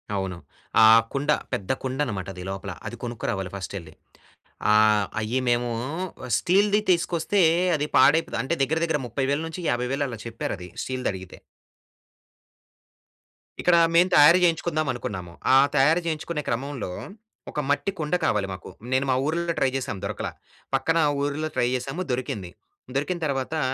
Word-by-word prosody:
అవును. 95 -2 -3 0.5
ఆ - - +10 0.3
కుండ, 140 +1 -2 0.2
పెద్ద 95 - -2
కుండనమాటది 105 -9 -3
లోపల. 95 0 -5 0.2
అది 115 - -6
కొనుక్కురావాలి 100 -6 -3
ఫస్టెళ్ళి. 95 -4 -7 0.8
ఆహ్, 105 -1 +5
అయ్యి 110 +4 -1
మేవూ 120 0 +1 0.7
స్టీల్‌‌ది 200 +3 +3
తీసుకొస్తే 175 +2 +1 0.4
అది 150 0 -1
పాడైపోద 145 0 +4
అంటే, 135 +6 -1
దగ్గర 160 +4 +1
దగ్గర 160 -3 0
30000-50000 140 0 -1
అలా 120 -3 -7
చెప్పారది 105 -5 -5
స్టీల్‌దడిగితే. 100 -8 -4 2.3
ఇక్కడా 175 -1 +5 0.2
మేము 175 +2 +5
తయారు 150 +4 +8
జేయించుకుందామనుకున్నాము. 145 - -1 0.2
ఆ - - +8 0.2
తయారు 155 +6 +4
చేయించుకునే 160 -1 -2
క్రమంలో, 130 -4 -3 0.6
ఒక - - -3
మట్టి 145 +7 +1
కుండ 150 +2 0
కావాలి 100 -2 +1
మాకు. 90 - -9 0.2
నేను 130 +1 +2
మా - - +3
ఊరుల్లో 170 +2 0
ట్రై 135 - +3
జేశాం, 120 -6 -3
దొరకలా. - - -3 0.4
పక్కనా 165 +5 +2 0.2
ఊరుల్లో 145 +2 -1
ట్రై 120 - +2
జేశాము, 135 +7 -4
దొరికింది. 110 -8 -3 0.4
దొరికిన 160 +6 -1
తర్వాతా 140 +2 -2
135 Hz, 125 wpm, -25 LUFS, 110-160 Hz, 2.3 s, ఆ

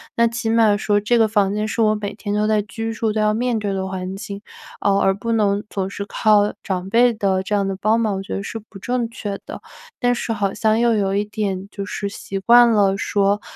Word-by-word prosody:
那 235 - +4
起 230 -1 -3
码 225 -2 +4
说 205 0 +1
这 235 +3 +2
个 225 - +4
房 205 -2 +1
间 210 +1 -1
是 230 - -2
我 215 -1 +3
每 205 -1 -4
天 205 -1 -4
都 210 +1 +1
在 215 -1 +2
居 225 +2 -5
住， 220 -1 -1
都 215 - -2
要 215 0 +2
面 235 0 0
对 200 -2 -2
的 190 0 -2
环 190 0 -5
境， 200 0 -7 0.4
呃， 200 -1 +2
而 195 - +3
不 230 +4 -3
能 205 -2 +1
总 190 -1 -3
是 200 0 -5
靠 210 -1 +2
长 185 -1 -3
辈 240 +3 +4
的 195 -3 0
这 210 - -4
样 200 -1 +1
的 195 - -2
帮 220 +2 +3
忙， 215 -3 0
我 195 - -4
觉 - - -6
得 195 - -3
是 225 - -5
不 195 - -11
正 245 +1 -2
确 205 -3 -5
的， - - -8 0.4
但 245 -1 +2
是 235 - -3
好 200 -3 -1
像 220 0 +1
又 235 -1 +3
有 195 -2 0
一 205 +1 0
点 200 -2 -3
就 200 -1 -6
是 205 0 -4
习 195 0 -6
惯 235 +3 +6
了 200 -3 +3
说 200 0 +1
210 Hz, 265 characters per minute, -20 LUFS, 200-225 Hz, 0.4 s, 惯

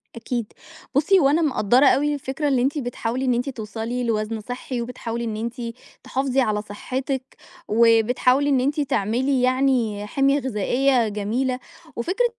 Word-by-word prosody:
أكيد، 230 -1 -4 0.4
بُصّي 370 +7 +4
هو 275 -3 +4
أنا 320 +4 +3
مقدّرة 260 -2 +3
أوي 295 +2 +3
الفكرة 280 +1 -3
اللي 260 -3 +2
أنتِ 280 +4 0
بتحاولي 245 0 -2
إن 250 - +3
أنتِ 250 +3 -1
توصلي 230 +1 -4
لوزن 220 -1 -1
صحّي 245 +1 -5
وبتحاولي 235 -1 -5
إن 220 -2 -3
أنتِ، 235 +3 -4 0.4
تحافظي 265 0 0
على 210 -3 0
صحتِّك، 260 +5 -5 0.3
وبتحاولي 235 +5 +3
إن 270 -2 +3
أنتِ 285 +4 0
تعملي 250 +2 0
يعني 250 -5 +1
حِمية 275 +4 +2
غذائية 255 0 +1
جميلة، 235 +5 -1 0.4
وفكرة 365 - 0
250 Hz, 145 wpm, -23 LUFS, 230-275 Hz, 0.4 s, بُصّي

